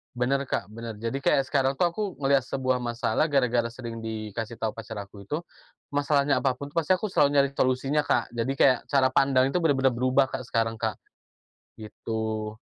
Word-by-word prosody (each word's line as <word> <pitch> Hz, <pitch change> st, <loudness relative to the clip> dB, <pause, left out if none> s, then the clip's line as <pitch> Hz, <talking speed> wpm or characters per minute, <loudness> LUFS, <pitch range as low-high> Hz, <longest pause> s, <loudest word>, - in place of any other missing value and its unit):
Benar, 135 Hz, +3 st, +1 dB
Kak, 135 Hz, -, -3 dB
benar. 110 Hz, 0 st, -8 dB
Jadi, 125 Hz, +4 st, -3 dB
kayak 135 Hz, 0 st, +3 dB
sekarang 135 Hz, -2 st, +2 dB
tuh 175 Hz, -, +4 dB
aku 170 Hz, +5 st, -4 dB, 0.2 s
ngelihat 135 Hz, -1 st, +3 dB
sebuah 130 Hz, -1 st, -1 dB
masalah, 120 Hz, +5 st, 0 dB
gara-gara 120 Hz, -4 st, +2 dB
sering 115 Hz, -2 st, -7 dB
dikasih 110 Hz, +1 st, -5 dB
tahu 110 Hz, -1 st, -2 dB
pacar 110 Hz, -1 st, -7 dB
aku 100 Hz, 0 st, -10 dB
itu, 150 Hz, +10 st, -3 dB, 0.5 s
masalahnya 145 Hz, 0 st, +1 dB
apa 135 Hz, -, +3 dB
pun 130 Hz, +3 st, -7 dB
tuh 145 Hz, -, -16 dB
pasti 165 Hz, 0 st, +1 dB
aku 185 Hz, +3 st, +2 dB
selalu 145 Hz, -7 st, +3 dB
nyari 140 Hz, 0 st, +3 dB
solusinya, 135 Hz, +4 st, +1 dB
Kak. -, -, +1 dB
Jadi, 120 Hz, +3 st, -1 dB
kayak 130 Hz, -3 st, +5 dB
cara 135 Hz, -2 st, +4 dB
pandang 130 Hz, 0 st, +3 dB
itu 175 Hz, +5 st, -1 dB
benar-benar 135 Hz, -5 st, +3 dB
berubah 130 Hz, +2 st, +3 dB
Kak, 130 Hz, -, -5 dB
sekarang 115 Hz, -1 st, -1 dB
Kak. -, -, -3 dB, 0.8 s
Gitu. 110 Hz, 0 st, -4 dB
130 Hz, 185 wpm, -26 LUFS, 115-140 Hz, 0.8 s, kayak